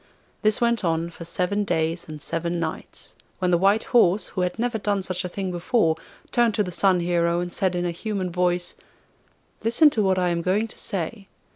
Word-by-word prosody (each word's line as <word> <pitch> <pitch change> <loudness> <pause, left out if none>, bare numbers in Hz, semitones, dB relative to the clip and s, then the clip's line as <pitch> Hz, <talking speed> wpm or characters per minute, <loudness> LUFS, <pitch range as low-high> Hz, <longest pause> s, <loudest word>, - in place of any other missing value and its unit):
This 215 -1 +3
went 235 -2 +1
on 165 0 0
for 170 - -10
seven 180 +4 0
days 165 -2 -1
and 165 +3 -3
nights, 160 -1 -6 0.2
when 180 -1 0
the 175 - +5
white 200 +4 +3
horse, 215 -4 +3
who 185 - -3
had 180 +2 -1
never 235 -1 -1
done 200 -1 0
such 185 0 -3
a 180 - -4
thing 190 0 -3
before, 175 -1 +1 0.4
turned 235 -3 +3
to 210 - +2
the 180 - -5
Sun 185 0 +3
Hero 170 0 +1
and 175 0 -3
said 185 -2 0
in 175 0 -1
a 175 - 0
human 190 0 -3
voice: 180 0 0 0.9
'Listen 240 +7 +5
to 220 - 0
what 190 -2 +2
I 180 -1 +2
am 170 -1 0
going 195 +6 +1
to - - -9
say. 195 +1 -3
180 Hz, 200 wpm, -24 LUFS, 170-205 Hz, 0.9 s, the